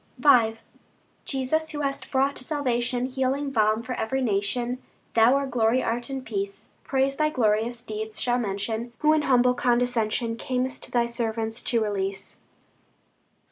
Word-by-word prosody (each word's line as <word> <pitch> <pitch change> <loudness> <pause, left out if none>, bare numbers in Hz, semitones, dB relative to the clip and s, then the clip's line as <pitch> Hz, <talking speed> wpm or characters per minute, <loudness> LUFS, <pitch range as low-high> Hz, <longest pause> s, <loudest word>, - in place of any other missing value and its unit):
V 245 -4 +5 0.7
Jesus, 300 +4 -1
who 295 -1 -4
hast 275 -1 -3
brought 270 +1 +1
salvation, 250 -3 -1
Healing 265 +2 -1
balm 215 -2 +2
for 250 +1 -4
every 265 +3 -1
nation, 240 +4 -1 0.3
Thou 230 +3 +5
our 280 0 +1
glory 245 -1 +2
art 235 +2 -2
and 265 -1 -5
peace. 395 0 -4
Praise 270 0 0
Thy 305 0 +2
glorious 230 -2 0
deeds 220 -1 -5
shall 245 0 +1
mention, 220 +2 -3
Who 305 0 +5
in 310 - +3
humble 250 -3 +4
condescension, 240 -2 +1
Cam'st 255 +1 -3
Thy 240 -1 +2
servants 225 -1 -3
to 230 -2 +1
release. 195 -2 -3
245 Hz, 140 wpm, -26 LUFS, 225-265 Hz, 0.7 s, V